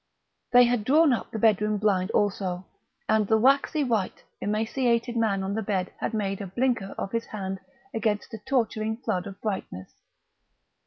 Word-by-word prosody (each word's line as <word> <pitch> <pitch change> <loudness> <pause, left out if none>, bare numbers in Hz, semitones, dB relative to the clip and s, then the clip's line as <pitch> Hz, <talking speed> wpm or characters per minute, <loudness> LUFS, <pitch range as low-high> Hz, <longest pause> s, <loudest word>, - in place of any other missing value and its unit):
They 245 0 +8
had 240 -2 +1
drawn 295 +4 +5
up 235 - -3
the - - -5
bedroom 210 -1 +3
blind 195 -3 +1
also, 190 -3 -1 0.4
and 215 -2 +2
the 220 - +4
waxy 275 +5 +3
white, 225 -7 -1 0.2
emaciated 235 +3 0
man 210 -4 +1
on 195 +1 -2
the 220 - -1
bed 195 -3 -2
had 225 - -2
made 195 -2 -2
a 200 - -5
blinker 230 -1 -1
of 195 - -4
his 230 0 -1
hand 195 -2 -5 0.3
against 215 -2 -1
the 225 - -7
torturing 220 -4 -1
flood 215 -6 -2
of 195 0 -9
brightness. 190 - -5
215 Hz, 165 wpm, -26 LUFS, 195-235 Hz, 0.4 s, They